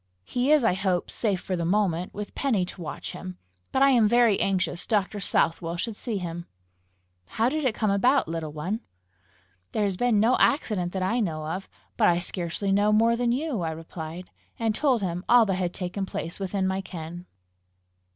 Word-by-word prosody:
"He 250 - 0
is, 305 -4 +5
I 225 - +4
hope, 185 -2 -1
safe 205 -5 0
for 185 - -3
the 170 - -2
moment, 180 -1 +1
with 205 0 -7
Penny 225 -10 +1
to 180 - -10
watch 160 - -6
him; 185 0 -8 0.3
but 265 - +3
I 275 - +6
am 235 -4 +5
very 235 -2 +4
anxious 185 -2 0
Dr. 205 -1 0
Southwell 165 -2 +1
should 220 +5 -3
see 225 -1 -3
him." 175 -2 -5 0.8
"How 225 - 0
did 305 +1 -2
it 235 -4 +1
come 215 -3 +1
about, 250 - +3
little 165 -1 -4
one?" 175 +9 -3 0.9
"There 215 - +1
has 195 -3 0
been 240 -2 +3
no 230 +4 +4
accident 210 - +2
that 190 -1 -1
I 225 +7 +1
know 160 -8 -2
of. 180 +5 -4 0.3
But - - +4
I 170 - +4
scarcely 175 +2 -2
know 205 +2 +3
more 225 +2 +4
than 240 0 +1
you," 265 - -1
I 165 - -1
replied 160 +2 -7 0.3
and 225 -2 0
told 255 -3 +1
him 175 -1 -2
all 240 -1 +7
that 195 - 0
had 180 -1 -1
taken 190 +1 -4
place 165 +1 -5
within 195 0 -1
my 190 +1 0
ken. 175 0 -8
195 Hz, 195 wpm, -26 LUFS, 175-225 Hz, 0.9 s, all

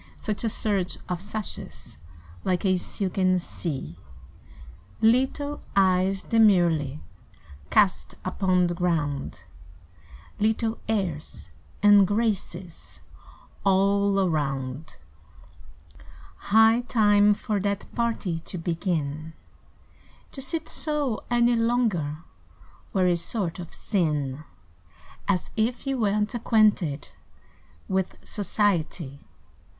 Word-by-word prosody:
Such 215 +1 -3
a 225 - +1
surge 200 -4 -1
of 180 -1 -3
sashes 205 - -6 0.4
Like 180 +1 0
a 190 -1 +4
silken 185 0 0
sea. 135 - -5 1.0
Little 265 +5 +2
eyes 190 0 +3
demurely 175 - +3 0.7
Cast 195 -3 +2
upon 185 -1 +2
the 175 - -1
ground, 150 - -2 1.0
Little 220 +1 0
airs 170 - -3 0.3
and 205 -2 +7
graces 195 -5 -3 0.6
All 200 +1 +3
around. 145 -5 -2 1.5
High 225 +3 +6
time 205 -3 +4
for 210 0 -2
that 200 0 -2
party 225 -8 -1
To 180 - -8
begin! 160 -3 -2 1.0
To 270 - -8
sit 320 +4 -3
so 295 -7 -1
any 240 0 +3
longer 220 -11 0 0.7
Were 185 -1 +2
a 180 -1 +3
sort 170 +1 -3
of 170 - -8
sin; 150 -7 -1 0.8
As 195 -3 0
if 230 +5 -1
you 270 -1 -1
were 210 -2 +2
n't 210 +3 -1
acquainted 210 - +2 0.8
With 190 -1 -1
society. 175 -8 -1
195 Hz, 95 wpm, -26 LUFS, 170-220 Hz, 1.5 s, and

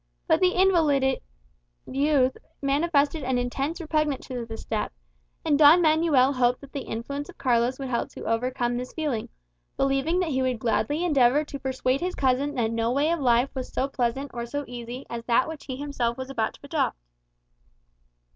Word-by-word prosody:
But - - +3
the 365 0 +3
invalided 315 -8 +3 0.6
youth 275 -1 +2 0.2
manifested 285 +1 +1
an 255 0 0
intense 270 +7 -2
repugnance 305 -4 -1
to 245 -3 -5
the 225 0 -6
step; 220 -1 -3 0.5
and 300 -2 +2
Don 310 +3 +8
Manuel 310 -5 +4
hoped 250 -1 +1
that 280 -1 -13
the 280 - -3
influence 280 +6 -5
of - - -12
Carlos 245 0 +1
would 270 -2 -5
help 235 - -1
to - - -8
overcome 240 +1 -1
this 250 +1 -6
feeling; 290 -9 -2 0.5
believing 275 +6 +1
that 350 - -1
he 260 -1 0
would 255 -2 0
gladly 235 +8 0
endeavour 280 -2 +4
to 285 -2 -7
persuade 260 0 -1
his 360 +1 -2
cousin 275 +2 +1
that 230 -3 0
no 230 0 0
way 285 +5 +2
of 340 - 0
life 245 0 +2
was 260 -2 -5
so 265 - 0
pleasant 265 +1 -2
or 235 0 -4
so 285 +4 -4
easy 245 +2 -7
as 235 0 -6
that 240 +1 +3
which 320 -2 -8
he 260 - -5
himself 255 -4 -2
was 260 +1 -6
about 225 -5 -1
to - - -21
adopt. - - -1
265 Hz, 185 wpm, -26 LUFS, 245-290 Hz, 0.6 s, Don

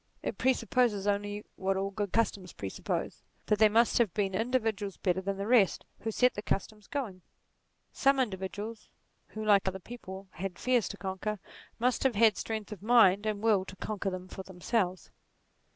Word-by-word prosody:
It - - -3
presupposes 250 -5 +2
only 205 0 -1
what 190 0 0
all 195 +1 -1
good 205 -1 -3
customs 200 -5 0
presuppose 95 -1 -4 0.2
that 210 - +1
there 215 -1 +7
must 230 +3 +4
have 225 -6 +3
been 195 -3 0
in 225 +5 0
dividuals 220 -6 -1
better 185 -1 +1
than 195 +1 -2
the 200 - -3
rest, 220 -4 +3
who 225 - -3
set 250 +3 +3
the 205 - -5
customs 210 0 -3
going. 220 -11 -4 0.7
Some 275 0 +3
individuals, 210 0 -3 0.4
who 215 0 -6
like 200 -2 +4
other 190 0 -1
people 190 -2 -9
had 180 +2 -5
fears 250 -3 +2
to 200 - -7
conquer, 195 +2 -3 0.4
must 250 +2 +1
have 265 -4 +2
had 220 0 +5
strength 220 -1 -4
of 205 -4 -7
mind 215 -3 +5
and 210 -1 -2
will 210 -4 +4
to 190 - -10
conquer 200 0 -3
them 185 0 -6
for 190 - -7
themselves. 185 0 -2
205 Hz, 180 wpm, -30 LUFS, 190-225 Hz, 0.7 s, there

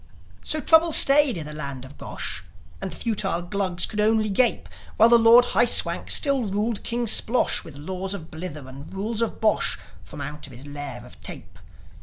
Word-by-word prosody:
So 310 - -3
trouble 320 +1 +3
stayed 280 -6 +7
in 155 - -6
the 150 - -9
land 140 -4 -7
of 135 +2 -14
Gosh; 90 - -7 0.4
And - - -4
the - - -8
futile 195 -6 -2
Glugs 185 -1 -2
could 210 - -7
only 215 0 +1
gape, 240 +4 0 0.3
While 225 +2 +5
the 235 0 +5
Lord 230 +2 +6
High 240 - +3
Swank - - 0
still 275 -4 +2
ruled 210 +2 -3
King 240 0 -3
Splosh 230 +2 +2
With 155 - -13
laws 185 +6 -6
of 160 -5 -11
blither 155 -4 -8
and 135 +3 -12
rules 210 +4 -4
of 230 - -3
bosh, 215 -1 0 0.3
From 150 - -12
out 150 +1 -7
his 130 0 -13
lair 145 0 -8
of - - -17
tape. 85 -1 -10
200 Hz, 190 wpm, -23 LUFS, 150-230 Hz, 0.4 s, stayed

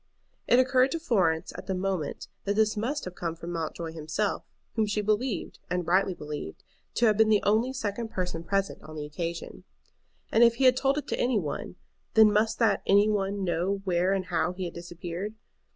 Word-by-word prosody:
It 245 - +5
occurred 255 0 +4
to 330 - -2
Florence 185 - +1
at - - -8
the 190 - -1
moment 185 -5 -2 0.2
that 200 0 0
this 215 0 +3
must 255 +8 -2
have 180 - -6
come 170 -2 -4
from 170 +1 -7
Mountjoy 165 0 -4
himself, 160 +6 -2 0.3
whom 220 -2 +1
she 210 +1 -1
believed, 215 +3 -1
and 180 -1 -1
rightly 185 +2 +2
believed, 150 - -7 0.3
to 240 - +3
have 215 -2 +4
been 220 0 +5
the 210 -2 +4
only 220 +5 +2
second 225 -3 -3
person 180 -4 -3
present 195 +3 -1
on 155 - -11
the 150 -1 -4
occasion. 165 +3 -5 0.7
And 230 - +5
if 235 0 +6
he 270 - -1
had 255 -1 +7
told 270 +2 +1
it 295 - -2
to - - -2
any 245 -2 +2
one, 160 0 -4 0.4
then 220 -1 +7
must 220 +2 +2
that 220 -4 +3
"any 205 +2 +5
one" 200 -1 -1
know 185 +3 -1
where 180 0 +1
and 195 -1 0
how 175 0 0
he 185 0 -4
had 170 - -5
disappeared. 175 +4 -6
195 Hz, 200 wpm, -28 LUFS, 175-220 Hz, 0.7 s, had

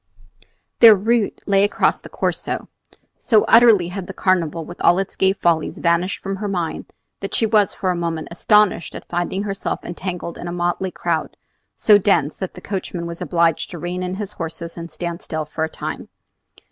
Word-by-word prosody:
Their 225 -2 +10
route 220 +2 0
lay 200 -1 +3
across 205 - +1
the - - -11
Corso. - - -2 0.5
So 220 -4 +3
utterly 225 -7 +6
had 180 0 -6
the 190 - -8
Carnival 170 -3 0
with 175 - -10
all 175 - +5
its 195 -1 -3
gay 190 0 +3
follies 170 -5 0
vanished 170 +2 +1
from 195 0 -3
her 205 +1 -3
mind, 175 -5 -3 0.3
that 195 - -4
she 225 - +2
was 210 -2 +2
for 185 - 0
a - - -1
moment 165 -2 -3
astonished 210 0 +2
at - - -9
finding 175 +3 -2
herself 195 -1 -3
entangled 175 -1 -5
in 175 - -6
a - - -4
motley 175 +2 -1
crowd, 170 -3 -3 0.4
so 210 -2 +5
dense 170 -7 +2
that 190 - -5
the - - -10
coachman 185 -3 -4
was 170 0 -6
obliged 170 -2 +1
to 175 - -7
rein 175 +3 -4
in 180 0 -3
his 205 0 -5
horses 165 0 -6
and 170 0 -7
stand 170 0 -5
still 155 -1 -4
for 160 +1 -2
some - - -19
time. - - -6
180 Hz, 190 wpm, -20 LUFS, 170-195 Hz, 0.5 s, Their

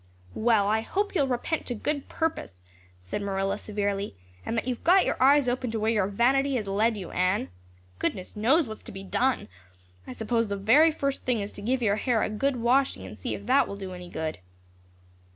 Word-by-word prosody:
"Well, 220 -3 +3
I 220 +1 +2
hope 405 - -2
you'll 285 -8 +2
repent 260 +6 -2
to 245 - -3
good 285 +5 -3
purpose," 315 - -3 0.4
said 90 - -5
Marilla 195 -1 -1
severely, 200 - -2 0.3
"and 230 - -3
that 230 - -1
you've 250 -2 -3
got 370 +2 +5
your - - 0
eyes 280 0 +5
opened 245 -1 -1
to 225 - -1
where 220 +1 +1
your 210 -4 +1
vanity 265 +7 +2
has 215 -5 -2
led 215 +3 +1
you, 185 -4 -7
Anne. 185 - 0 0.5
Goodness 185 -3 -3
knows 260 +8 +3
what's 215 0 -8
to - - -10
be 195 - -8
done. 255 +7 0 0.6
I - - -6
suppose 230 - 0
the 225 +11 +4
first 275 -1 -1
thing 250 -3 +1
is 200 0 -5
to - - -9
give 245 +4 0
your 205 -1 +2
hair 235 -1 +1
a - - -1
good 275 +6 0
washing 245 - +1
and 95 - -9
see 95 - -4
if 200 - -9
that 260 +4 +4
will 200 - -6
do 190 -2 -6
any 180 -1 -9
good." 160 - -4
225 Hz, 205 wpm, -27 LUFS, 200-260 Hz, 0.6 s, got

